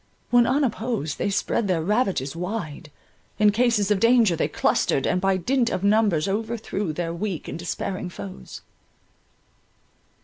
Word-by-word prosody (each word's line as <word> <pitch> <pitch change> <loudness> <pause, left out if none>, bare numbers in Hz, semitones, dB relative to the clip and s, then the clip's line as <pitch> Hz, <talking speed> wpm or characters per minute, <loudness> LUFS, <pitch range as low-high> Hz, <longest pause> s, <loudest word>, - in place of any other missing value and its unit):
When 240 -1 +5
unopposed 235 - -1
they - - 0
spread 200 +2 0
their 175 -4 0
ravages 190 - 0
wide; 175 -4 -5 0.5
in 210 -1 +5
cases 215 -2 +2
of 205 - +3
danger 230 -4 +4
they - - 0
clustered, 135 - +1
and 180 - +1
by 195 0 +2
dint 240 +6 +1
of 185 - -3
numbers 200 -6 +3
overthrew 210 -3 -2
their 165 +1 -3
weak 180 -1 -4
and - - -6
despairing 180 +2 -4
foes. 95 - -9
200 Hz, 140 wpm, -24 LUFS, 170-225 Hz, 0.5 s, When